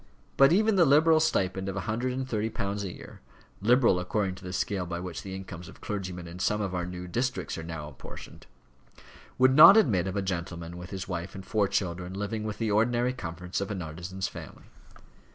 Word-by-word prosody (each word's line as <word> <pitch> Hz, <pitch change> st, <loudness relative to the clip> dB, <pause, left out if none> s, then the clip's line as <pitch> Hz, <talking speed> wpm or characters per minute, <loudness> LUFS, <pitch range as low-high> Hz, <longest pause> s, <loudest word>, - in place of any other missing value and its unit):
But 135 Hz, +2 st, +6 dB
even 215 Hz, +3 st, +3 dB
the 175 Hz, -, +6 dB
liberal 155 Hz, +3 st, +5 dB
stipend 95 Hz, -11 st, 0 dB
of 95 Hz, -, -4 dB
a 100 Hz, -, -2 dB
hundred 120 Hz, +6 st, -2 dB
and 130 Hz, 0 st, -3 dB
thirty 110 Hz, -3 st, -1 dB
pounds 100 Hz, -1 st, -3 dB
a 95 Hz, -, -4 dB
year -, -, -12 dB, 0.4 s
liberal 115 Hz, -3 st, +4 dB
according 95 Hz, +1 st, -1 dB
to 90 Hz, -, -13 dB
the 90 Hz, -, -6 dB
scale 90 Hz, 0 st, -2 dB
by 85 Hz, 0 st, -4 dB
which 90 Hz, -2 st, -6 dB
the 95 Hz, -1 st, -7 dB
incomes 90 Hz, -2 st, -8 dB
of -, -, -14 dB
clergymen 90 Hz, -4 st, -5 dB
in 85 Hz, +2 st, -9 dB
some 105 Hz, +3 st, +1 dB
of 100 Hz, -3 st, -2 dB
our 90 Hz, -1 st, -2 dB
new 90 Hz, 0 st, -6 dB
districts 125 Hz, +8 st, -2 dB
are -, -, -5 dB
now 80 Hz, -2 st, -6 dB
apportioned 70 Hz, -3 st, -11 dB, 0.9 s
would 130 Hz, +1 st, +5 dB
not 165 Hz, +8 st, +10 dB
admit 100 Hz, -, +3 dB
of 95 Hz, -, -3 dB
a 100 Hz, -, 0 dB
gentleman 85 Hz, -2 st, -4 dB
with 90 Hz, +1 st, -8 dB
his 95 Hz, -1 st, -5 dB
wife 85 Hz, 0 st, -5 dB
and 95 Hz, -1 st, -8 dB
four 105 Hz, -2 st, +1 dB
children 90 Hz, -2 st, -2 dB
living 105 Hz, +2 st, -3 dB
with 105 Hz, -1 st, -4 dB
the 110 Hz, -2 st, -1 dB
ordinary 120 Hz, +4 st, +2 dB
comforts 90 Hz, -4 st, -5 dB
of 100 Hz, -, -3 dB
an 95 Hz, -4 st, -3 dB
artisan's 90 Hz, +4 st, -5 dB
family. -, -, -10 dB
95 Hz, 210 wpm, -28 LUFS, 90-115 Hz, 0.9 s, not